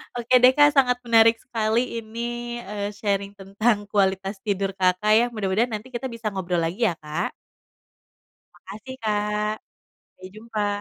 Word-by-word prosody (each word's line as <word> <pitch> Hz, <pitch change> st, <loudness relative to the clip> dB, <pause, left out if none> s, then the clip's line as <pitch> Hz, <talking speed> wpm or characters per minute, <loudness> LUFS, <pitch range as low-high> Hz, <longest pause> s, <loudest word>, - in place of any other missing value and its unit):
Oke 240 Hz, +1 st, +1 dB
deh, 255 Hz, +1 st, +7 dB
Kak, 290 Hz, 0 st, +6 dB
sangat 255 Hz, -3 st, +3 dB
menarik 230 Hz, -1 st, +5 dB
sekali 230 Hz, 0 st, -1 dB
ini, 240 Hz, +2 st, -5 dB
eee, 205 Hz, 0 st, -4 dB
sharing 200 Hz, -1 st, -2 dB
tentang 205 Hz, +2 st, 0 dB
kualitas 195 Hz, 0 st, 0 dB
tidur 195 Hz, -2 st, -2 dB
Kakak 190 Hz, +2 st, +1 dB
ya. 225 Hz, +3 st, +5 dB
Mudah-mudahan 210 Hz, +3 st, 0 dB
nanti 220 Hz, +5 st, -6 dB
kita 255 Hz, +2 st, -4 dB
bisa 230 Hz, -3 st, -5 dB
ngobrol 180 Hz, -3 st, -1 dB
lagi 190 Hz, +8 st, 0 dB
ya, 170 Hz, -, -1 dB
Kak. 155 Hz, +2 st, -4 dB, 1.2 s
Makasih, 240 Hz, +6 st, -10 dB
Kak, 210 Hz, 0 st, 0 dB, 0.4 s
sampai 185 Hz, 0 st, -15 dB
jumpa. 215 Hz, -1 st, -3 dB
215 Hz, 145 wpm, -24 LUFS, 195-235 Hz, 1.2 s, deh